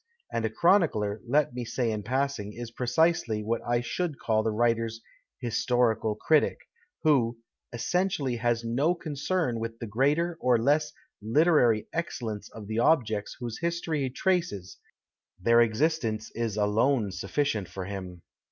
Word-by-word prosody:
(And 115 -1 0
a - - +1
chronicler, 110 - +2
let 140 +1 +2
me 125 0 -4
say 120 0 -1
in 105 -1 -3
passing, 125 -2 -2
is 120 0 -7
precisely 125 -4 +1
what 115 +2 -1
I 120 0 +1
should 155 +5 -3
call 110 -1 +1
the 110 - 0
writer's 115 0 0 0.2
" - - -53
historical 120 -2 +1
critic 155 +8 +2 0.2
" 470 0 -35
— 365 - -50
who 125 -7 +3 0.2
" - - -61
essentially 140 -1 -1
has 120 0 0
no 135 +9 +1
concern 155 -4 -2
with 115 0 -5
the 115 - -6
greater 145 +10 +1
or 125 -1 +4
less 150 +6 +2 0.3
literary 120 -2 +3
excellence 120 -11 -4
of 110 -2 -10
the 110 +2 -2
objects 115 -7 +1
whose 120 -2 -5
history 170 -2 -1
he 135 - 0
traces 165 - -1 0.3
— - - -53
their 115 +5 +5
existence 115 -2 0
is 115 -3 -2
alone 110 +2 +2
sudieient 100 +3 -1
for 95 +1 -6
him.") 95 -3 -7
120 Hz, 160 wpm, -28 LUFS, 110-150 Hz, 0.3 s, their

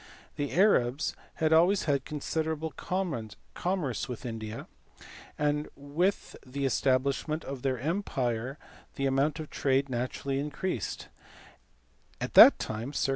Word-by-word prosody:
The 145 -1 -2
Arabs 155 - +3 0.2
had 160 0 +2
always 175 +5 +5
had 140 -3 0
considerable 160 +1 -2
commerce 165 - -3
with 125 +1 -6
India, 110 -2 -5 0.7
and 150 0 0
with 155 +8 -1
the 140 +1 -3
establishment 140 +4 +1
of 135 -2 -6
their 130 -1 0
empire 130 - -2 0.4
the 135 - -1
amount 140 +3 +1
of 155 - -7
trade 135 0 +1
naturally 130 +2 -2
increased; 145 - -3 1.1
at - - -4
that - - +10
time, 115 +6 -4
circ. 140 - 0
140 Hz, 120 wpm, -29 LUFS, 130-160 Hz, 1.1 s, that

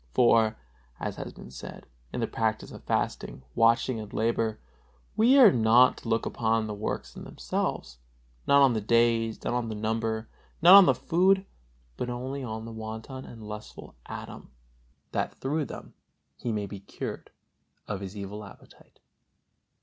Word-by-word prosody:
For, 115 -3 +4 0.4
as - - -4
has - - -6
been 60 - -12
said, 65 - -9 0.3
in - - -3
the - - 0
practice 110 -1 -2
of - - -11
fasting, 65 - -2
watching 115 +1 +3
and 105 -1 -8
labor, 110 -1 0 0.6
we 235 +6 +5
are 245 -8 +9
not 120 +2 +5
to 115 - -8
look 115 -1 +1
upon 110 -1 0
the 105 - -4
works 105 +1 -4
in - - -8
themselves, 65 -2 -4 0.5
not 140 0 +6
on 135 -3 +5
the 110 - -1
days, 115 0 +2
not - - -1
on 120 -2 -1
the 110 - -4
number, 110 +1 -2 0.3
not 175 +3 +8
on 195 -2 +10
the - - +4
food, 190 +3 +2 0.5
but 125 - -3
only 130 +3 -4
on 110 -2 -5
the 115 - -7
wanton 110 +4 -7
and 115 -2 -11
lustful 105 0 -9
Adam, - - -8 0.6
that - - -2
through 145 +3 -2
them - - -10 0.4
he 120 - -4
may 105 -2 -2
be 100 0 -8
cured 100 - -7 0.6
of 100 -2 -4
his 100 +1 -7
evil 100 +1 -6
appetite. 100 - -16
115 Hz, 165 wpm, -28 LUFS, 110-125 Hz, 0.6 s, on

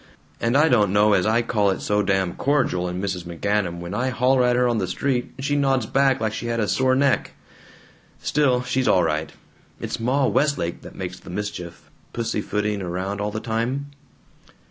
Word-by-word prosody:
And 115 +4 +2
I 150 +2 +5
don't 105 -8 +3
know 105 +1 +4
as 95 0 +2
I 115 +2 +2
call 105 -3 +1
it 95 - -1
so 105 0 +1
damn 95 -3 0
cordial 125 -11 0
in 90 +1 -4
Mrs. 95 -2 -3
McGanum 90 +1 -1
when 85 +2 -6
I 125 +5 0
holler 125 +1 +2
at 125 0 +3
her 125 0 +3
on 120 -2 +1
the 95 - -1
street 125 +6 -1
and 135 - -5
she 145 - +1
nods 135 -4 +2
back 135 +2 +2
like 110 -1 -1
she 120 - -4
had 115 0 -1
a 105 - +1
sore 130 +3 +2
neck. 140 -1 +1 0.9
Still, 130 -4 +1
she's 130 +1 0
all 90 - +4
right. 80 -1 -1 0.5
It's - - -4
Ma 130 +4 +1
Westlake 140 - 0
that - - -12
makes 90 0 -6
the - - -13
mischief, 90 -3 -6 0.2
pussyfooting 105 -3 -2
around 95 +3 -3
all 105 - -1
the 110 - -4
time. 120 +6 -2
110 Hz, 195 wpm, -23 LUFS, 95-130 Hz, 0.9 s, I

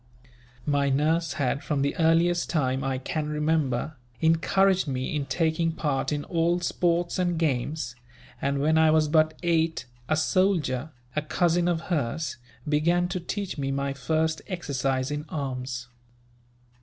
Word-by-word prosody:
"My 145 -1 +2
nurse 160 +5 +1
had, 140 0 -1
from 140 -2 0
the 140 - 0
earliest 170 +2 +3
time 135 -4 0
I 135 -1 -1
can 150 +3 -3
remember, 150 -2 0 0.2
encouraged 185 +3 +3
me 130 +2 -2
in 145 -2 -2
taking 165 +3 +1
part 145 -4 -1
in 145 -1 -1
all 170 +1 +1
sports 175 0 0
and 175 -2 +1
games; 145 -3 -1 0.5
and 140 +1 0
when 155 +3 +3
I 160 0 +5
was 155 0 +4
but 155 0 +3
eight 165 -1 +1 0.2
a 155 - +2
soldier, 160 -6 +1 0.3
a 150 - +1
cousin 170 +3 +1
of 170 -2 +1
hers, 155 -3 -2 0.3
began 170 +4 +2
to 185 0 -2
teach 185 -1 -4
me 135 -1 -1
my 140 0 -1
first 160 +4 0
exercise 135 -7 -1
in 150 0 -2
arms. 130 -4 -4
155 Hz, 145 wpm, -26 LUFS, 140-170 Hz, 0.5 s, I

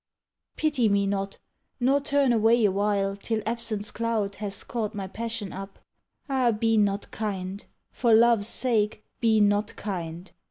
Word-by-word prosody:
Pity 290 -8 +2
me 200 0 +2
not, 195 0 -2 0.4
nor 270 +3 +3
turn 280 -2 +2
away 225 0 +4
awhile 200 0 +1
Till 215 +2 -2
absence's 220 -2 -1
cloud 220 -3 -2
has 200 -2 -3
caught 220 -3 -3
my 195 -2 -4
passion 220 0 -4
up. 195 +1 -8 0.5
Ah, 260 -4 +2
be 225 +1 +1
not 205 -1 +1
kind! 195 -2 -4 0.3
for 235 -2 +1
love's 225 -2 +5
sake, 220 -4 0 0.2
be 225 -2 +3
not 205 +1 +2
kind! 175 -3 -5
215 Hz, 145 wpm, -26 LUFS, 200-230 Hz, 0.5 s, love's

